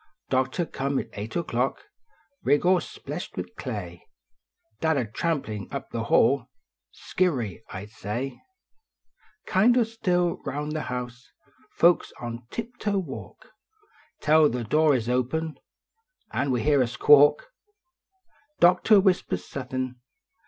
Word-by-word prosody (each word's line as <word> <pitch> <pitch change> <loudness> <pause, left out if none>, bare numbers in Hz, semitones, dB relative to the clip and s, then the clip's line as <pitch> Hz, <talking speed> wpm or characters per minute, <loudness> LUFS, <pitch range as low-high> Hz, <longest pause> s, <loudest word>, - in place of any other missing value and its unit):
Doctor 130 +6 +1
come 140 -2 -2
at - - -3
eight 105 +6 -5
o 170 - 0
clock, 125 -2 -1 0.6
Rig 145 - +2
all 185 0 +5
spleshed - - -7
with - - -6
clay; - - -6 0.8
Dad 160 -2 +2
a 125 - 0
trampin 110 -3 -3
up 140 - -6
the 115 -1 -3
hall, 130 +1 +3 0.4
Skeery? 125 - -1
I 95 +1 -6
sh - - -14
d - - -25
say! 120 +6 -4 1.0
Kind 230 +6 +4
o 245 - +5
still 180 -6 0
rouu 150 +1 -3
the 155 - -2
house, 125 -1 -6 0.5
Folks 175 +1 +4
on 120 0 -6
tip 235 +2 -6
toe 205 -2 0
walk 190 - -7 0.7
Tell 155 0 +5
the 125 0 -3
door 150 +5 +3
is 115 -3 -2
open 135 +6 -1 0.7
An 140 - -1
we 125 -3 0
hear 145 -2 +4
a 125 - +2
squawk! 145 - +5 1.1
Doctor 180 +4 +6
whispers 180 - +1
suthin 130 -1 -4
140 Hz, 135 wpm, -26 LUFS, 125-170 Hz, 1.1 s, Doctor